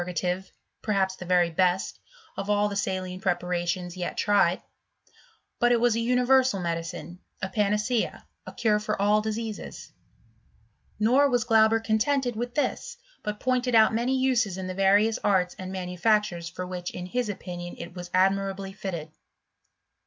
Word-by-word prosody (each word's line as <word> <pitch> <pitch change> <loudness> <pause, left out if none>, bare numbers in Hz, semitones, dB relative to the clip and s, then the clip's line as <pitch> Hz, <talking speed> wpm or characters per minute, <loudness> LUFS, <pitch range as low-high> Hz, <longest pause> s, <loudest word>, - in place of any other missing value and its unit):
gative, 180 +2 -3 0.3
perhaps 195 -3 +1
th6 180 - -9
very 175 -1 +3
best, 180 +2 0 0.4
of 195 +1 -5
all 205 0 +3
the 205 - -4
saline 185 -2 -3
prepar 180 -1 0
ations 175 +1 -3
yet 180 -1 -4
tried; 195 -4 +3 1.0
but 240 0 +4
it 240 - +4
was 240 -1 +3
a - - 0
universal 250 -1 +3
medicine, 170 +1 -4 0.2
a 190 - -2
panacea, 210 +4 0 0.2
a - - -6
cure 215 -2 +1
for 215 -1 -3
all 210 +1 +3
diseases: 220 0 -5 1.1
nor 255 +7 +4
was 245 -3 +2
Glauber* 225 -1 +4
contented 240 +3 0
with 240 +2 -4
this, 480 +10 -2 0.2
but 210 -1 -4
pointed 255 -1 +1
out 220 0 +6
many 245 +4 +1
uses 245 -7 +1
in 190 - -4
the 185 - -4
various 200 +3 +3
arts 185 -3 +2
and 185 0 -6
manufactures 180 -1 0
for 180 +1 -6
which 180 -1 -5
in 180 - -7
his 240 +4 -2
opinion 175 -3 -6
it 170 +1 -8
was 175 -1 -8
admirably 195 +1 +1
fitted. 170 -6 -5
200 Hz, 155 wpm, -26 LUFS, 180-225 Hz, 1.1 s, out